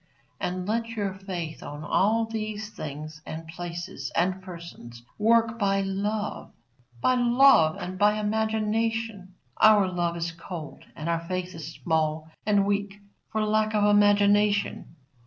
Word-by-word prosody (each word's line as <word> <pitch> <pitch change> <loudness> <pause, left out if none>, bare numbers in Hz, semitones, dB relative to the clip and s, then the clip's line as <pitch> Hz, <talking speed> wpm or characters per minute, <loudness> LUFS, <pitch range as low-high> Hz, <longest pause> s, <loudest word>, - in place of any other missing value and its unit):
And 180 +1 -3
let 230 +2 0
your 205 -4 -3
faith 180 -4 -6
on 145 +1 -7
all 225 +7 +2
these 215 -1 -4
things, 155 -5 -7
and 160 +1 -7
places, 175 -4 -6
and 185 +2 +1
persons, 170 -10 -10
work 230 +1 +3
by 195 -1 +2
love, 205 +2 -3 0.5
by 255 - +4
love 245 -9 +5
and 185 +1 -6
by 210 +1 +4
imagination. 220 -1 -1 0.2
Our 210 -3 +6
love 175 -2 -1
is 170 0 -2
cold 165 -2 -8
and 155 - -6
our 170 0 0
faith 185 0 -3
is 160 -1 -8
small 160 -1 -1 0.2
and 205 -2 +4
weak 200 0 -1 0.3
for 215 -1 0
lack 215 0 +1
of 210 - +3
imagination. 205 -2 +3
195 Hz, 140 wpm, -26 LUFS, 170-215 Hz, 0.5 s, Our